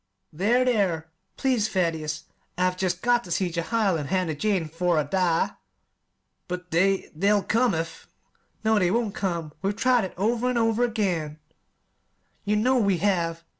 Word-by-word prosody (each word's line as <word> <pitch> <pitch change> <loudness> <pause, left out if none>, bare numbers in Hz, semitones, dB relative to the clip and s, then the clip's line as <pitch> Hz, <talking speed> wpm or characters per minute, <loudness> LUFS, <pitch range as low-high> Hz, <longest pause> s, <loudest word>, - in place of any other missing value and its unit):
"There, 225 +10 +2
there, 180 -10 0 0.3
please, 250 -6 +1
Thaddeus! 160 -4 -1 0.3
I've 180 0 +1
jest 185 -1 -2
got 240 0 +3
ter - - -12
see 180 0 0
Jehiel 190 +2 0
and 145 -3 -5
Hannah 185 -4 0
Jane 185 +1 0
'fore 170 +2 0
I 150 - +3
die!" 180 -1 +1 1.0
"But 180 0 -6
they 190 +3 +1
they'll 200 +4 +2
come 230 -4 +2
if 165 +1 -5 0.3
" - - -41
"No, 220 -1 +4
they 180 -2 +2
won't 225 0 0
come. 170 -7 -3
We've 195 +1 -1
tried 245 -2 +3
it 185 - -8
over 230 +5 +1
an' 250 - 0
over 225 0 +2
again; 185 -10 -1 1.1
you 210 +1 +1
know 250 +4 +3
we 200 -5 +2
have. 170 -4 0
190 Hz, 165 wpm, -25 LUFS, 170-220 Hz, 1.1 s, No